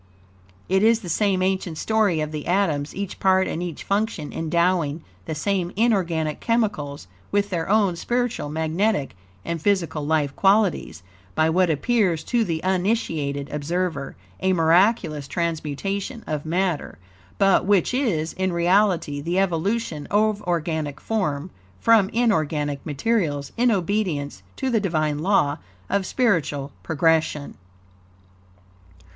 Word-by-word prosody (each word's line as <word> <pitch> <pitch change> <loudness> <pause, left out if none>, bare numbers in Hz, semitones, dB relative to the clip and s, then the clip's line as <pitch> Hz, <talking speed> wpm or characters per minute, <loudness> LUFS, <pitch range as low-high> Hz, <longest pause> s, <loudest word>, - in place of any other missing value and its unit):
It 190 +1 +2
is 225 +1 +4
the 180 - -7
same 190 +1 +1
ancient 185 -3 -1
story 210 -7 +1
of 155 0 -3
the 150 -1 -5
atoms; 165 -6 0
each 200 0 -5
part 190 -1 +3
and 165 - -3
each 175 -4 -5
function 200 -7 -1
endowing 165 -1 0 0.2
the 160 - -4
same 180 +2 -1
inorganic 180 -9 +1
chemicals 205 - -1 0.3
with 205 0 +1
their 170 -1 -2
own 200 -4 +3
spiritual, 240 -4 -1
magnetic, 160 - 0 0.3
and 170 -2 -3
physical 170 -6 0
life 145 -2 0
qualities, 195 - +2 0.3
by 160 0 +3
what 180 +1 +3
appears, 175 - +1
to 240 +4 +1
the 165 -5 -3
uninitiated 175 - -1
observer, 155 0 -2 0.2
a 190 0 +2
miraculous 165 -3 +2
transmutation 170 - -3
of 150 0 -4
matter, 175 -1 -1 0.4
but 195 -2 +4
which 200 +1 +3
is, 195 - 0
in 185 0 -1
reality, 175 -4 +2
the 170 +4 -2
evolution 190 -2 -1
of 210 0 +2
organic 160 -4 -1
form 180 -7 -2 0.3
from 225 -4 +4
inorganic 155 - 0
materials, 150 - -1
in 245 +1 +3
obedience 180 - -1
to 265 - -2
the 225 - +3
Divine 155 -6 0
law 155 -5 +2 0.3
of 195 -1 +1
spiritual 160 - 0
progression. 160 -2 +1
175 Hz, 130 wpm, -23 LUFS, 155-200 Hz, 0.4 s, is